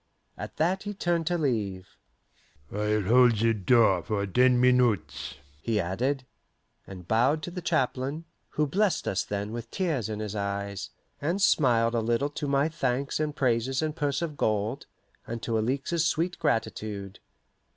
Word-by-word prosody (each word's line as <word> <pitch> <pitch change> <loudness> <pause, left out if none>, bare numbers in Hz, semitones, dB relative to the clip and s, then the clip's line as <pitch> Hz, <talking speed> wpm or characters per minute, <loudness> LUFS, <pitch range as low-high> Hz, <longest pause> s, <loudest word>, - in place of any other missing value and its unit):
At - - -8
that 180 +5 +1
he 205 0 -5
turned 170 -3 0
to 175 0 +1
leave. 105 - -1 0.8
"I'll 105 0 0
hold 120 +2 +5
the 115 +2 +3
door 105 -3 +4
for 100 +2 -2
ten 125 +5 +4
minutes," 105 - +2 0.3
he 110 +4 0
added; 125 +10 -1 0.6
and 90 -3 -10
bowed 130 - +2
to 175 - -5
the 180 +1 -5
chaplain, 135 +2 -1 0.2
who 150 - 0
blessed 195 +6 +1
us 95 - 0
then 100 +1 -4
with 115 0 -6
tears 150 - -1
in 105 -1 -4
his 105 -1 -4
eyes, 100 -1 -3 0.3
and 170 +7 0
smiled 120 - +3
a 115 - +1
little 120 +5 +1
to 145 - -4
my 140 +1 +2
thanks 140 -4 -1
and 150 -1 -1
praises 130 +2 +1
and 155 -1 -2
purse 145 0 -1
of 150 -4 -4
gold, 105 0 -1 0.4
and 115 0 -5
to 115 - -1
Alixe's 140 +8 0
sweet 170 +2 -1
gratitude. 110 - -2
120 Hz, 160 wpm, -27 LUFS, 105-150 Hz, 0.8 s, hold